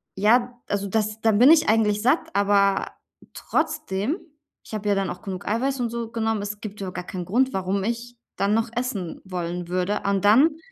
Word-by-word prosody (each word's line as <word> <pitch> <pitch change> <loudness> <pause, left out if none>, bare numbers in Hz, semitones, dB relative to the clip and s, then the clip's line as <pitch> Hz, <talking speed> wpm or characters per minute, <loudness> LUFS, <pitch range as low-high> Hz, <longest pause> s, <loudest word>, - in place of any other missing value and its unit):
ja? 240 +5 +3
Also 200 0 -2
das 215 +1 -1
da 225 - +4
bin 245 +8 +6
ich 310 -8 +5
eigentlich 210 -2 +2
satt, 260 +7 +2
aber 200 -1 +3 0.5
trotzdem 205 - -1 0.5
ich - - -14
habe 210 -1 -3
ja 200 - +3
dann 195 -1 -1
auch 180 - -7
genug 190 -4 -6
Eiweiß 260 +5 0
und 235 - 0
so 235 -1 -4
genommen, 225 -2 -1
es 205 +1 -5
gibt 210 -1 -7
überhaupt 185 -1 -5
gar 180 - -5
keinen 180 -2 -5
Grund, 255 +8 +1
warum 190 +1 -1
ich 235 +2 -4 0.2
dann 200 +1 +1
noch 225 +1 +1
essen 230 -9 -3
wollen 175 -1 -4
würde. 185 +3 -1
Und 200 -1 +1
dann 295 +9 +5
210 Hz, 195 wpm, -24 LUFS, 195-235 Hz, 0.5 s, bin